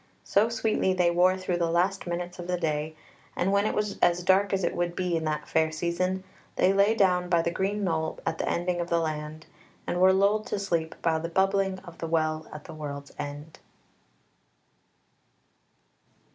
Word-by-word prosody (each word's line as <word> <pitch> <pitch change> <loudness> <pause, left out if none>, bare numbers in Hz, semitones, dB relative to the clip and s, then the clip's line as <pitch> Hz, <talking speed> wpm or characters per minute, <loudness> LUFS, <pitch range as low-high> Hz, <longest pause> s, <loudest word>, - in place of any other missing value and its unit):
So 210 +3 +2
sweetly 220 -4 +1
they 175 -2 +3
wore 180 +2 +3
through 185 -1 -2
the 170 -1 0
last 180 +3 0
minutes 175 +1 -4
of 175 - -6
the 180 0 0
day, 155 -1 -2 0.4
and 185 +2 0
when 200 +1 +3
it - - -2
was 210 -1 -2
as 175 0 +3
dark 190 +2 +3
as 195 -1 0
it - - 0
would 175 0 -1
be 180 -2 -1
in 160 -1 -1
that 155 -1 -2
fair 160 0 +1
season, 180 +4 -1 0.3
they 190 - +3
lay 200 +3 +4
down 180 -4 +2
by 170 -2 +3
the 170 - 0
green 200 +3 -1
knoll 160 -3 -1
at 165 0 -2
the - - -1
ending 175 0 -1
of 170 - -4
the 170 - +2
land, 155 -1 -4 0.4
and 175 - -1
were 190 0 +7
lulled 200 +3 +2
to - - -2
sleep 170 -5 -1
by 160 -1 +2
the 165 +1 -4
bubbling 195 +1 +1
of 170 -1 -12
the 165 - -3
Well 155 -1 0
at 150 -1 -9
the 165 - -10
World's 140 -2 -7
End. 145 +2 -7
175 Hz, 195 wpm, -27 LUFS, 160-190 Hz, 0.4 s, were